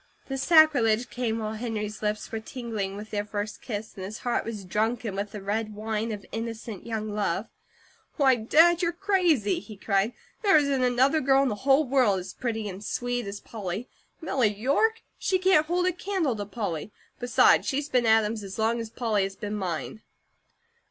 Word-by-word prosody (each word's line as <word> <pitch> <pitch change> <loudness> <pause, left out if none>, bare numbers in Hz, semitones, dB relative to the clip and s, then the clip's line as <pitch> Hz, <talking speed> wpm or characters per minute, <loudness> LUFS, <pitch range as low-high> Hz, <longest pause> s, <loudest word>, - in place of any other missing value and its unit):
This 270 -1 -3
sacrilege 270 -8 +4
came 235 -3 -1
while 215 -1 -3
Henry's 215 -2 -4
lips 210 0 -2
were 225 - -2
tingling 220 -4 -4
with 210 +1 -9
their 205 -1 -1
first 210 +1 -5
kiss, 215 -2 -5
and 190 - -7
his 205 +4 -6
heart 240 - 0
was 215 -4 -6
drunken 220 +2 -1
with 200 +1 -3
the 205 -2 -7
red 215 +1 -2
wine 220 +1 -2
of 205 -2 -6
innocent 225 -2 -6
young 215 -2 -3
love. 205 -1 -1 0.7
"Why, 270 -3 +5
Dad, 320 +9 +4
you're 340 -1 +1
crazy!" 345 - +2
he 205 +1 -11
cried. 200 +3 +1 0.3
"There 400 -7 +5
isn't 280 -3 +2
another 260 +5 +3
girl 270 +1 +4
in 270 - +1
the - - -1
whole 270 +7 +3
world 250 -7 +3
as 185 +1 -8
pretty 225 -4 -3
and 195 +1 -7
sweet 245 +1 -2
as 200 +1 -5
Polly. 210 +1 -5 0.3
Milly 255 -9 +1
York? 285 - +1 0.2
She 375 - +1
can't 370 -5 +4
hold 355 +2 +1
a 370 - +3
candle 360 - -1
to 205 -2 -5
Polly! 205 -5 -4 0.3
Besides, 245 -2 +4
she's 285 +2 -1
been 250 -4 +2
Adam's 220 0 +3
as 195 -1 -7
long 225 +2 +1
as 230 -1 -5
Polly 220 -3 0
has 195 0 -2
been 205 +1 -5
mine!" 185 +2 -4
225 Hz, 185 wpm, -27 LUFS, 210-270 Hz, 0.7 s, Why